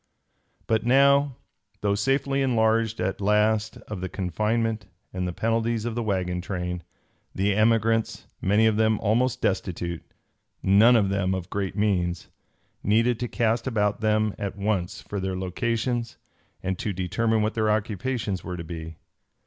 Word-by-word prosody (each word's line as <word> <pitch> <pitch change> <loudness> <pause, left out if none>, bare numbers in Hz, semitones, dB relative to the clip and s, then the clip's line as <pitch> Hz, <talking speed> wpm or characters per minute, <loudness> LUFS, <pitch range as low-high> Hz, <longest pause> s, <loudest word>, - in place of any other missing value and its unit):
But 110 -1 +1
now, 140 +2 +4 0.5
though 100 -1 +1
safely 135 +6 +1
enlarged 115 -3 +2
at 95 +2 -2
last 105 +1 +2
of 105 -4 -5
the 95 - -3
confinement 105 +4 -1 0.3
and 90 -1 -2
the - - -2
penalties 115 +3 0
of 120 - -2
the 120 - -2
wagon 90 -4 -1
train, 90 -1 -4 0.5
the 100 +2 +1
emigrants, 115 +1 +2 0.2
many 105 +3 +3
of 110 -1 +3
them 110 -1 +3
almost 115 +4 +1
destitute, 85 -3 -1 0.6
none 105 +6 +6
of 105 -4 +3
them 95 -1 0
of 90 -2 -6
great 100 -2 -2
means, 90 -5 0 0.5
needed 115 +3 +2
to 120 - -2
cast 115 +1 0
about 105 -4 0
them 110 -1 +2
at 100 -1 -4
once 100 +1 -2
for 100 - -4
their 95 0 -2
locations 115 +5 -2 0.5
and 95 -1 -2
to 105 - -2
determine 105 +5 0
what 110 - 0
their 110 -1 +1
occupations 105 -1 -1
were 90 -1 -5
to 85 - -5
be. 80 0 -7
105 Hz, 150 wpm, -25 LUFS, 95-115 Hz, 0.6 s, none